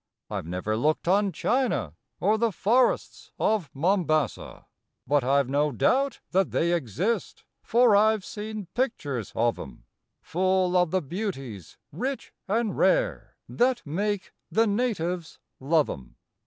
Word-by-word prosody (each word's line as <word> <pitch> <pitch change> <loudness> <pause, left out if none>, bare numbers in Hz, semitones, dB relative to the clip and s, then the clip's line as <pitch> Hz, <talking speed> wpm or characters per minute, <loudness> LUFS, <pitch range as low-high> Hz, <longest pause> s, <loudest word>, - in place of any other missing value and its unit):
I - - -2
ve 80 - -11
never 90 +5 -2
looked 155 +8 0
on 200 +2 +3
China, 235 - 0 0.3
or 215 +3 +2
the 230 -1 +2
forests 235 +7 +1
of 210 -9 +1
Mombassa, 155 -1 0 0.4
But 145 0 +2
I 140 +2 +3
ve 130 - -8
no 145 +1 +2
doubt 265 - +1
that 190 0 +2
they 170 +1 +1
exist, 170 - -2 0.2
for 235 -2 +4
I 220 +2 +5
ve 200 - -14
seen 210 -1 -6
pictures 145 - -2
of 115 +1 +1
em, 65 -3 -10 0.4
Full 185 +1 +1
of 180 -2 +4
the 185 +1 0
beauties 135 - -5
rich 255 - -4
and 220 +2 0
rare - - +1
that 245 0 +1
make 200 +6 -2 0.2
the 225 +1 +3
natives 190 -7 -1 0.2
love 150 +3 +2
em. 60 -3 -8
185 Hz, 140 wpm, -26 LUFS, 140-220 Hz, 0.4 s, I